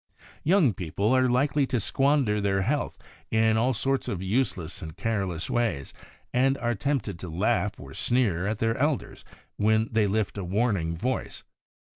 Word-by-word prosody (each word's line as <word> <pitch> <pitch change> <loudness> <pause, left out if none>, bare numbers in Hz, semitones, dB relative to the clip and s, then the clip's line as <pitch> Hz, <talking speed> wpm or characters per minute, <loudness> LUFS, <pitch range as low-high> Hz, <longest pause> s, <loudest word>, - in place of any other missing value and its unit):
Young 165 - +4
people 100 +7 0
are 130 -1 +3
likely 135 +2 +2
to 125 - 0
squander 135 -3 +2
their 95 -1 +1
health 145 +8 -1 0.3
in 110 0 +3
all 120 +4 +2
sorts 135 +3 -1
of 95 -2 -3
useless 95 -5 -1
and 80 0 -8
careless 95 -7 -2
ways, 115 - -1 0.4
and 135 +2 +3
are 120 -2 0
tempted 110 -4 -2
to 90 - -6
laugh 80 +3 0
or - - -10
sneer 100 -8 +1
at 110 0 -1
their 115 +1 +1
elders 145 +1 -1 0.3
when 110 +2 +2
they 110 -2 +2
lift 105 0 -1
a - - -3
warning 95 -3 0
voice. 125 +7 -3
110 Hz, 160 wpm, -27 LUFS, 95-130 Hz, 0.4 s, Young